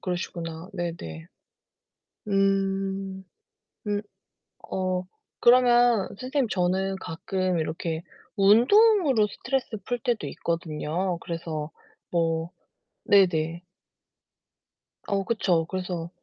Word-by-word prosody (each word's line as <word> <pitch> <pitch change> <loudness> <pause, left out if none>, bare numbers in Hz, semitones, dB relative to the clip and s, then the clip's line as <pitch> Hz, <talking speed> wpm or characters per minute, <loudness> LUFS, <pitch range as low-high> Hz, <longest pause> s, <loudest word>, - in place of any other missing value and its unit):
그러시구나. 170 -1 -4
네네. 165 - -5 1.0
음. 195 -1 0 0.6
음 205 0 0 0.7
어 185 -1 -1 0.4
그러면 240 -3 +5
선생님 260 0 0
저는 190 +1 0
가끔 185 +1 -2
이렇게 160 +1 -3 0.3
운동으로 255 - +5
스트레스 240 +2 -3
풀 245 0 -2
때도 235 -1 -1
있거든요. 170 +2 -2
그래서 160 -2 -4 0.4
뭐 165 -1 0 0.5
네네. 170 -4 +3 1.5
어 195 -1 0
그쵸. 180 -7 +1
그래서 180 -3 -4
190 Hz, 185 characters per minute, -26 LUFS, 170-210 Hz, 1.5 s, 그러면